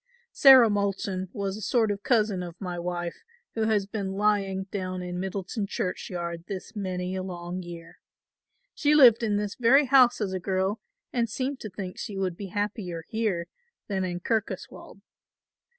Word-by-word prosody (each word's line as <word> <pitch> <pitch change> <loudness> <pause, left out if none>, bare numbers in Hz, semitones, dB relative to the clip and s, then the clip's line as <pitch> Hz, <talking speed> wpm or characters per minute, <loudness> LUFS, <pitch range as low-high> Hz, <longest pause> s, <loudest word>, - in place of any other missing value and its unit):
Sarah 265 -4 +8
Moulton 195 -2 -1
was 200 -3 -3
a 215 - -8
sort 220 0 +2
of 200 -1 -4
cousin 215 -6 +2
of 175 -1 -8
my 180 -3 -4
wife 175 0 -4 0.3
who 220 -1 0
has 215 -3 +2
been 195 -2 -4
lying 195 -2 +1
down 185 -2 -3
in 180 0 -4
Middleton 190 +2 -3
churchyard 170 -3 -4
this 200 +2 -7
many 185 -2 -3
a 190 - -2
long 180 0 -5
year. 170 -1 -10 0.7
She 300 0 +2
lived 245 -6 +8
in 210 -3 +1
this 205 -1 -2
very 265 +4 +5
house 255 -2 +5
as 200 -4 -2
a 185 - -2
girl 190 +3 -1 0.3
and 235 -2 +1
seemed 265 +4 -3
to 215 - -6
think 185 -1 -7
she 200 - -5
would 185 -3 -1
be 200 +2 -7
happier 195 -4 -3
here 215 -7 -1 0.4
than 195 -2 -1
in 175 -1 -3
Kirkoswald. 220 +2 -4
195 Hz, 165 wpm, -27 LUFS, 180-220 Hz, 0.7 s, Sarah